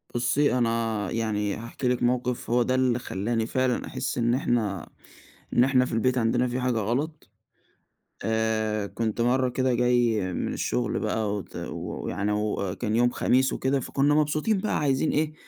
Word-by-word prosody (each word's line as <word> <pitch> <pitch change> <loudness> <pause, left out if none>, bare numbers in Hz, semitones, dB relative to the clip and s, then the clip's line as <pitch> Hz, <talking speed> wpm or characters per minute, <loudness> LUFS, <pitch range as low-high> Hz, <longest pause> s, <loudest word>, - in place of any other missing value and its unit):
بُصّي، 125 +2 +2
أنا 115 -4 0
يعني 105 -3 -1
هاحكي 115 +3 -5
لِك 125 -1 +1
موقف، 125 0 0
هو 120 0 +3
ده 130 - 0
اللي 125 -2 +2
خلاني 110 +2 -2
فعلًا 130 -1 0
أحس - - -3
إن 120 0 +2
احنا 110 - -1 0.6
إن 120 - +5
احنا 130 -1 +3
في 125 - -5
البيت 125 +3 +1
عندنا 120 +2 +2
في 125 +1 -2
حاجة 125 -2 0
غلط. 140 +9 -2 0.9
آآ، 110 -1 0
كنت 115 +1 -2
مَرّة 125 +2 +2
كده 130 0 0
جاي 120 -2 +2
من - - -2
الشغل - - -1
بقى 105 -2 -1
وت 100 - -7
ويعني 105 +1 -4
وكان 105 0 -1
يوم 120 +1 +4
خميس 130 +2 +2
وكده، 135 +1 0
فكنا 140 +3 +1
مبسوطين 155 +8 +1
بقى 205 +3 -1
عايزين 140 +1 +1
إيه 155 +1 0
120 Hz, 160 wpm, -26 LUFS, 110-130 Hz, 0.9 s, إن